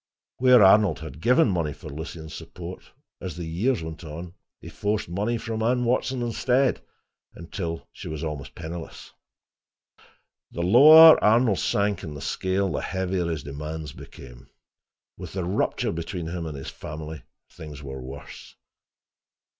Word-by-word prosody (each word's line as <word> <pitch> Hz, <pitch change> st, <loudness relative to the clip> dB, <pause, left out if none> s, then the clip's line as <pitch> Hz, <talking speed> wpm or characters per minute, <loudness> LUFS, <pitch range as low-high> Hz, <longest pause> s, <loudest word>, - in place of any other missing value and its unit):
Where 125 Hz, -3 st, +6 dB
Arnold 100 Hz, +1 st, +5 dB
had 80 Hz, -1 st, -9 dB
given 125 Hz, -, +4 dB
money 85 Hz, -7 st, -1 dB
for -, -, -12 dB
Lucien's 80 Hz, +1 st, -8 dB
support, 90 Hz, +1 st, -9 dB, 0.4 s
as 90 Hz, -2 st, -6 dB
the 85 Hz, -, -5 dB
years 90 Hz, +5 st, 0 dB
went 80 Hz, +2 st, -8 dB
on 85 Hz, +3 st, -8 dB, 0.3 s
he -, -, -12 dB
forced 105 Hz, +1 st, -2 dB
money 105 Hz, +7 st, -1 dB
from 115 Hz, -1 st, -4 dB
Anne 125 Hz, +2 st, +1 dB
Watson 125 Hz, +1 st, 0 dB
instead 125 Hz, +3 st, +1 dB, 0.5 s
until 85 Hz, -1 st, -6 dB
she -, -, -9 dB
was 80 Hz, 0 st, -5 dB
always 75 Hz, -4 st, -5 dB
penniless. 80 Hz, +1 st, -8 dB, 1.4 s
The 85 Hz, -, -4 dB
lower 155 Hz, -, +9 dB
Arnold 110 Hz, -1 st, +4 dB
sank 100 Hz, 0 st, 0 dB
in 75 Hz, -5 st, -7 dB
the -, -, -7 dB
scale, 95 Hz, +3 st, -1 dB
the -, -, -2 dB
heavier 95 Hz, -2 st, -2 dB
his 80 Hz, -3 st, -3 dB
demands 75 Hz, +1 st, -6 dB
became. -, -, -13 dB, 0.7 s
With -, -, -9 dB
the 95 Hz, -1 st, -2 dB
rupture 90 Hz, +4 st, -1 dB
between 85 Hz, +1 st, -5 dB
him 85 Hz, -1 st, -4 dB
and 75 Hz, -3 st, -6 dB
his 70 Hz, -, -7 dB
family, 80 Hz, 0 st, -8 dB, 0.3 s
things 75 Hz, -2 st, -10 dB
were 65 Hz, -1 st, -7 dB
worse. 65 Hz, +2 st, -10 dB
85 Hz, 145 wpm, -25 LUFS, 80-110 Hz, 1.4 s, lower